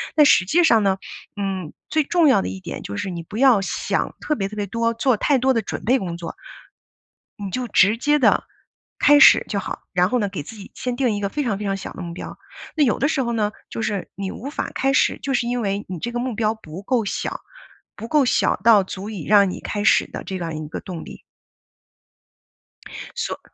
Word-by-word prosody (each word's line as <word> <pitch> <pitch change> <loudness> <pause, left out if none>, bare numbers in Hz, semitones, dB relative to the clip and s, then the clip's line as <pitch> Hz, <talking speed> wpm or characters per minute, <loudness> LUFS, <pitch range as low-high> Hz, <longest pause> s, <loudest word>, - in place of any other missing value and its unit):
但 300 - +6
实 220 - +6
际 345 - +3
上 225 -8 +4
呢， 195 -1 +2 0.4
嗯， 190 -5 -3 0.2
最 310 -1 +2
重 340 +2 +3
要 275 - +5
的 90 - -3
一 95 0 -6
点 - - -7
就 100 - -6
是 190 - -3
你 170 -2 -5
不 205 +6 -8
要 250 -5 +5
想 195 - -2
特 300 - -1
别 195 -2 -2
特 215 - -9
别 205 - -1
多 230 +3 0
做 235 +1 +2
太 280 +6 +2
多 260 +1 +2
的 230 - +1
准 210 - -6
备 250 +4 +4
工 175 -7 -4
作。 170 -1 -7 1.1
你 200 - -4
就 250 +6 -3
直 210 +1 +4
接 295 +5 +2
地 275 - +3 0.5
开 290 0 +6
始 275 - +8
就 200 - -1
好， - - -5
然 180 +1 +3
后 250 - +2
呢， 205 -3 0
给 185 -6 -5
自 220 +10 -11
己 200 - -11
先 250 -1 -3
定 250 -2 +1
一 205 - -3
个 200 - 0
非 295 - -2
常 215 -7 -1
非 210 - -5
常 195 - 0
小 - - -7
的 185 - -7
目 170 - -6
标。 170 - -8 0.4
那 300 - +4
有 235 - +1
的 280 - +2
时 285 -4 0
候 235 -1 -2
呢， 215 -2 0 0.2
就 - - -5
是 210 -4 -3
你 195 0 -4
无 265 +8 -7
法 - - -4
开 270 0 +1
始， - - +2
就 275 - -2
是 245 -2 +1
因 245 0 -1
为 200 0 -2
你 185 -2 -5
这 240 +9 -4
个 240 - -2
目 245 -1 -2
标 215 0 0
不 185 -4 -10
够 235 +2 0
小， - - -3 0.6
不 225 +3 -7
够 290 -2 +3
小 - - +2
到 215 -4 +5
足 195 +2 -7
以 200 -8 -6
让 200 -2 +5
你 - - -6
开 205 - -3
始 - - +4
的 - - -6
这 190 - -5
样 170 -3 -4
一 155 -1 -6
个 - - -6
动 180 -4 -7
力。 - - -11 2.0
所 - - -3
215 Hz, 260 characters per minute, -22 LUFS, 190-250 Hz, 2.0 s, 始